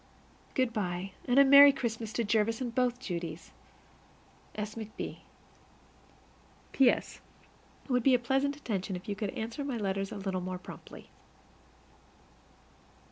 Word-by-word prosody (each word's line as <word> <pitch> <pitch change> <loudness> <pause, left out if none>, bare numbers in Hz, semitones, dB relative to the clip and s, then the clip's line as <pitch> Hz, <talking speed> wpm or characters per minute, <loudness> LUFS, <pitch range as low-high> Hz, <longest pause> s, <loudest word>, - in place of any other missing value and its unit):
Good 255 -3 +1
by, 190 -3 -3
and 245 0 +1
a 280 - +8
merry 280 +1 +9
Christmas 230 -4 -4
to 235 - 0
Jervis 220 +1 +1
and 245 -3 -4
both 250 0 +1
Judies. 170 -7 -6 1.0
S. 210 0 -4
McB. 220 -1 -7 1.5
P.S. 265 -3 +2 0.6
It - - -8
would 250 0 +3
be 260 +2 +5
a - - +5
pleasant 270 +4 0
attention 200 -9 -3
if 180 +1 -9
you 205 - -2
would 210 - -1
answer 230 +6 -4
my 275 -4 -3
letters 195 -2 -2
a - - -5
little 190 -2 -3
more 185 0 -4
promptly. 180 - -12
225 Hz, 135 wpm, -30 LUFS, 195-255 Hz, 1.5 s, merry